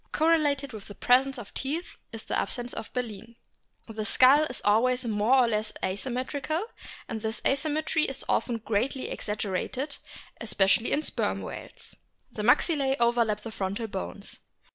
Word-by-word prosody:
Correlated 295 -4 +2
with 210 -2 -9
the 205 - -10
presence 265 +2 +3
of 230 -5 -9
teeth 310 +6 -3 0.2
is 225 -1 -8
the - - -2
absence 245 0 -1
of - - -6
baleen. 230 -2 -5 0.5
The 220 -1 -4
skull 265 +7 +6
is 250 - -5
always 250 +5 +3
more 220 +3 +3
or 255 -2 +5
less 215 -1 -1
asymmetrical, 260 - -2 0.4
and 220 - -4
this 220 0 -3
asymmetry 310 +2 +2
is 270 - -3
often 240 -2 +1
greatly 230 +4 -1
exaggerated, 210 +7 -3 0.4
especially 215 0 +2
in 295 - +2
the - - -8
Sperm - - -1
whales. - - -8 0.4
The 215 - -5
maxillae 270 +3 +3
overlap 235 -3 +2
the 225 - -7
frontal 200 +2 -3
bones. 90 - -6
240 Hz, 150 wpm, -28 LUFS, 215-270 Hz, 0.5 s, skull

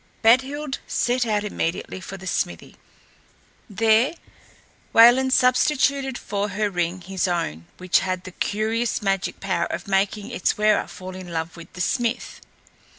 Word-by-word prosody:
Badhild 265 +5 +2
set 245 0 0
out 210 -1 0
immediately 185 -2 -3
for 195 - -8
the 190 - -11
smithy. 85 - -3 0.9
There 225 - +3 0.8
Wayland 245 +3 +7
substituted 265 +1 +2
for 205 +1 -3
her 205 +1 -1
ring 175 0 -2
his 190 +1 -2
own, 125 - -2
which 185 0 +2
had 185 -1 -3
the 185 - -9
curious 220 +4 -1
magic 195 -1 -1
power - - -1
of - - -5
making 200 +1 0
its - - 0
wearer 215 0 +3
fall 185 0 -9
in 185 -2 -9
love 165 0 -3
with 170 -1 -12
the 180 - -6
smith. 240 +5 -1
205 Hz, 145 wpm, -23 LUFS, 185-240 Hz, 0.9 s, Wayland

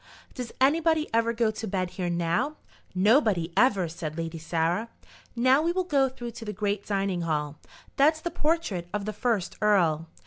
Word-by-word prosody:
"Does 250 -3 -6
anybody 315 +3 +3
ever 230 0 +2
go 230 -1 +1
to 220 +1 -6
bed 185 -2 -2
here 180 -2 -3
now?" 175 - 0 0.4
"Nobody, 195 - +3
ever," 200 -8 +3
said 160 -1 -6
Lady 165 0 -4
Sarah. 170 +7 -1 0.5
"Now 255 +4 +4
we 335 +2 +1
will 370 +1 0
go 280 -6 +2
through 240 -2 -7
to 230 0 -9
the 210 - -3
great 205 -1 -2
dining 195 -3 -1
hall. 150 -3 -2 0.4
That's 310 +3 +4
the 345 +2 -4
portrait 300 - -1
of 205 -1 -2
the 215 - -3
first 210 -3 -1
earl." 170 -7 +2
210 Hz, 175 wpm, -27 LUFS, 175-260 Hz, 0.5 s, Now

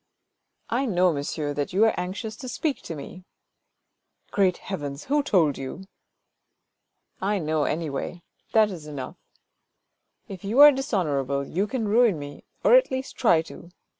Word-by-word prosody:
" - - -48
I 275 - -1
know, 180 -4 +3
monsieur, 145 +1 -3
that 145 +3 -3
you 205 +4 +4
are 225 - +3
anxious 195 +5 -4
to 255 - -7
speak 295 +2 -2
to 165 - -5
me." 180 +5 -9 0.6
" - - -45
Great 190 -3 +2
heavens! 145 -7 -6
who 295 +2 +1
told 170 - +2
you? 135 +8 -7 0.5
" - - -54
" - - -44
I 210 - +1
know, 155 -3 0
anyway; 160 +2 -3 0.3
that 215 -2 +4
is 160 -5 -8
enough. 140 -4 -7 1.1
If 190 -2 -9
you 215 +7 0
are 295 0 +11
dishonour 195 - -1
able, 140 +1 -2
you 190 +8 -1
can 230 -2 -2
ruin 220 -3 +4
me, 145 0 -9 0.2
or - - +5
at - - +5
least 260 0 -4
try 170 -10 +3
to. 170 - -12
180 Hz, 170 wpm, -25 LUFS, 150-220 Hz, 1.1 s, are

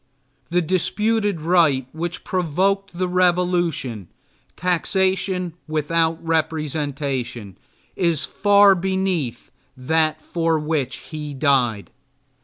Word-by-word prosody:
The 175 +1 +1
disputed 205 +2 0
right 155 -6 +3
which 170 +2 -4
provoked 190 +3 0
the 185 0 0
revolution 175 - 0 0.5
taxation 185 0 0
without 160 +1 0
representation 145 - -2 0.4
is 170 -5 +1
far 205 -1 +5
beneath 185 -9 -2 0.3
that 155 +4 +1
for 165 0 0
which 150 -3 -1 0.2
he 150 -2 -6
died. 130 -7 +1
165 Hz, 85 wpm, -21 LUFS, 145-180 Hz, 0.5 s, far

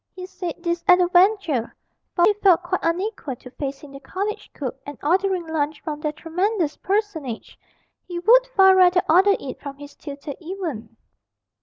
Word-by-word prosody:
He 365 -1 -7
said 365 -3 -6
this 340 -1 -1
at 360 -1 +7
a 355 - +3
venture, 360 - +2 0.4
for 345 - +4
he 415 - +4
felt 360 -3 +5
quite 360 +1 -1
unequal 340 - -2
to 250 +1 -14
facing 275 +1 -6
the 275 - -10
college 395 +9 -5
cook 265 -4 -6
and 290 - -9
ordering 370 +2 +1
lunch 310 -1 -2
from 300 -2 -5
that 300 0 -3
tremendous 350 -1 -1
personage 370 - -3 0.5
he 350 - -5
would - - +5
far 385 -6 +5
rather 360 -1 +5
order 380 +5 +5
it 260 - -8
from 280 -1 -8
his 290 0 -11
tutor 285 -1 -8
even. 320 - -6
345 Hz, 170 wpm, -22 LUFS, 290-380 Hz, 0.5 s, at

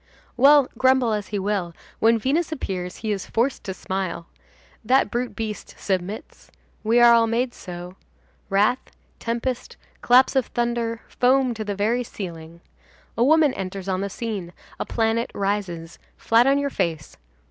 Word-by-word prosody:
Well, 280 +1 +6
grumble 260 -3 +3
as 210 -2 -3
he 210 - -3
will, 190 -4 -2 0.2
when 230 +1 +4
Venus 300 +9 0
appears 185 - -4
he 220 -1 -3
is 195 -2 -3
forced 250 +4 0
to 190 - -3
smile. 185 -3 -4 0.6
That 250 -1 +3
brute 245 +1 -2
beast 220 -2 -5
submits. 190 +2 -4 0.3
We 225 +2 +3
are 240 0 +8
all 230 -1 +4
made 240 +2 0
so. 180 0 -9 0.5
Wrath, 210 +6 +3 0.4
tempest, 235 +2 -3 0.2
claps 255 +3 +5
of 265 -3 +2
thunder, 235 -1 -2
foam 255 0 +2
to 220 -1 -5
the 205 -1 -3
very 225 +5 +1
ceiling. 170 -6 -8 0.5
A 235 - +2
woman 305 0 +4
enters 190 0 -5
on 190 0 -1
the 200 - -2
scene, 200 -5 -5 0.3
a - - -3
planet 225 0 0
rises; 190 -5 -3 0.2
flat 230 +3 +3
on 275 +1 +4
your 285 0 -1
face! 165 -8 -2
225 Hz, 155 wpm, -23 LUFS, 190-245 Hz, 0.6 s, are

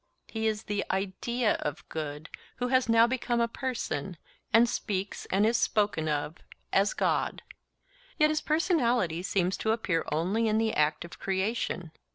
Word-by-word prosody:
He 220 0 -2
is 215 -1 -1
the 205 -1 -1
IDEA 205 +5 0
of 150 -1 -4
good 155 0 -5 0.2
who 250 0 -2
has 255 -2 +3
now 230 0 +6
become 240 -1 0
a 235 - +3
person, 225 - -3 0.3
and 230 +2 +6
speaks 200 -4 -3
and 195 +3 +2
is 230 +2 +3
spoken 205 -7 +1
of 150 +2 -2 0.4
as - - +3
God. - - 0 0.7
Yet 305 -1 +4
his 305 0 0
personality 250 - +1
seems 185 0 0
to 220 - +1
appear 185 -7 0
only 190 +9 +1
in 215 0 +2
the 220 0 +1
act 150 +2 +1
of 170 - -12
creation. 190 -3 -2
210 Hz, 160 wpm, -29 LUFS, 175-235 Hz, 0.7 s, now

